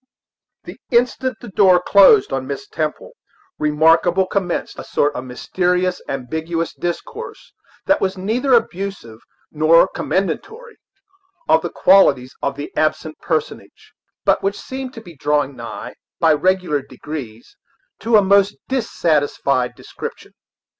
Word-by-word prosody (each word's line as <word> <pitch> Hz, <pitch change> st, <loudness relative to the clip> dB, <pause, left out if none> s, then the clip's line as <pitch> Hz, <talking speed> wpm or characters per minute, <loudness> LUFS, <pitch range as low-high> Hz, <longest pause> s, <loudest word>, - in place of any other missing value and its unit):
The -, -, -11 dB
instant 250 Hz, 0 st, +1 dB
the 240 Hz, -, -9 dB
door 185 Hz, -2 st, +5 dB
closed 205 Hz, -, +5 dB
on -, -, -3 dB
Miss 410 Hz, -, -6 dB
Temple, 435 Hz, +3 st, -4 dB, 0.5 s
Remarkable 165 Hz, +5 st, +3 dB
commenced 185 Hz, -2 st, -3 dB
a -, -, -6 dB
sort 145 Hz, 0 st, 0 dB
of 130 Hz, -, -6 dB
mysterious, 180 Hz, +8 st, -1 dB
ambiguous 160 Hz, +6 st, -3 dB
discourse, 415 Hz, -, -6 dB, 0.3 s
that 295 Hz, -, +2 dB
was 190 Hz, 0 st, -1 dB
neither 240 Hz, +8 st, +1 dB
abusive 195 Hz, -, -3 dB, 0.3 s
nor 160 Hz, +3 st, +5 dB
commendatory 430 Hz, -, -3 dB, 0.7 s
of 160 Hz, 0 st, +4 dB
the 175 Hz, -, -4 dB
qualities 140 Hz, -11 st, +4 dB
of 140 Hz, -, -2 dB
the 145 Hz, +1 st, -7 dB
absent 155 Hz, 0 st, -1 dB
personage, 160 Hz, -2 st, -4 dB, 0.3 s
but -, -, +3 dB
which 195 Hz, +1 st, -2 dB
seemed 265 Hz, 0 st, -7 dB
to 225 Hz, -, -8 dB
be 175 Hz, -6 st, -14 dB
drawing 145 Hz, -1 st, 0 dB
nigh, 115 Hz, -1 st, -8 dB, 0.3 s
by 160 Hz, -1 st, +4 dB
regular 180 Hz, -2 st, +1 dB
degrees, 130 Hz, -4 st, -9 dB, 0.4 s
to 225 Hz, -1 st, +3 dB
a 205 Hz, -, +4 dB
most 200 Hz, +1 st, +3 dB
dissatisfied 150 Hz, -, 0 dB
description. -, -, -9 dB
175 Hz, 125 wpm, -19 LUFS, 150-200 Hz, 0.7 s, door